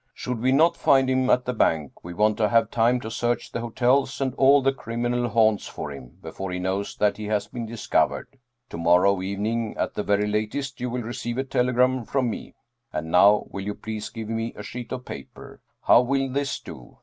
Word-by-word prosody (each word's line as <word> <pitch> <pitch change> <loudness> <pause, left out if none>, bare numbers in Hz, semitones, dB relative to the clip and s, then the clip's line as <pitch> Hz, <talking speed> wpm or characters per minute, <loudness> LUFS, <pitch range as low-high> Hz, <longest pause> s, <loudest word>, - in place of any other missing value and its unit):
Should 125 -2 -4
we 130 +3 +2
not 165 +5 +4
find 135 -4 +3
him 130 0 +1
at 125 - +3
the 125 - -1
bank, 80 - 0
we 85 - -7
want 105 +4 +2
to 105 -2 +2
have 115 -1 +3
time 120 +2 +2
to 110 - -6
search 120 +1 -1
the - - -3
hotels 125 +3 +1
and 135 -2 -1
all 135 +1 +5
the 135 0 +3
criminal 120 0 -2
haunts 110 -3 +2
for 75 - -6
him, 65 -3 -11
before 95 0 -6
he 90 - -3
knows 95 +2 -2
that 105 -1 +1
he 105 - -6
has 105 -1 0
been 120 -2 -6
discovered. 115 +3 -1 0.3
To - - -6
morrow 90 +3 +4
evening 105 +4 -2
at - - -1
the - - -2
very 105 0 +1
latest 110 +6 -3
you 125 - -1
will 120 0 -3
receive 120 +1 -4
a 135 - 0
telegram 125 -1 +1
from 130 -2 0
me. - - -8 0.4
And 80 +1 -4
now, 100 +4 +5
will 100 - -5
you 105 +1 -4
please 110 -1 -6
give 110 -2 -7
me 115 +1 -3
a 105 - -8
sheet 120 +3 -7
of 125 -1 -5
paper? 70 -1 -10 0.2
How - - +6
will 135 +1 0
this 140 +1 -2
do? - - -12
115 Hz, 215 wpm, -24 LUFS, 105-125 Hz, 0.4 s, How